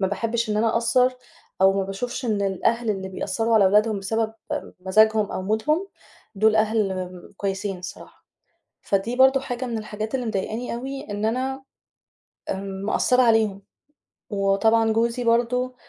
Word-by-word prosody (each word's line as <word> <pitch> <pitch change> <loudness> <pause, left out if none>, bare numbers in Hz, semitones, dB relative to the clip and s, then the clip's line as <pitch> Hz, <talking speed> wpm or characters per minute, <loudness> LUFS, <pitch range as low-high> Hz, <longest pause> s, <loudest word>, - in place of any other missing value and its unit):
ما 190 - +2
باحبّش 230 +3 -1
إن 210 - 0
أنا 225 +1 +2
أأثّر 250 +2 +3 0.5
أو 190 0 +6
ما 195 0 0
باشوفش 240 +7 -4
إن 210 -3 0
الأهل 220 +4 0
اللي 190 -2 -3
بيأثّروا 225 +4 -1
على 215 -3 +6
أولادهم 210 +2 +3
بسبب 220 +3 -1 0.5
مزاجهم 215 +2 +3
أو - - -3
مودهم 295 - 0 0.5
دول 215 +2 +3
أهل 215 -2 +1 0.4
كويسين 195 -1 -3
الصراحة، 180 - -11 0.6
فدي 200 +5 -1
برضه 265 +1 +5
حاجة 255 -1 -4
من 235 -2 -3
الحاجات 215 +2 -4
اللي 250 - -2
مضايقاني 220 +3 -3
أوي 270 +3 -6
إن 205 +1 -2
أنا 260 +4 -2 0.9
آمم، 195 0 -5
مأثّرة 250 +3 +3
عليهم، 220 -4 +2 0.7
وطبعًا 220 +2 +2
جوزي 235 +2 0
برضه 245 +2 +1
220 Hz, 145 wpm, -24 LUFS, 200-240 Hz, 0.9 s, أو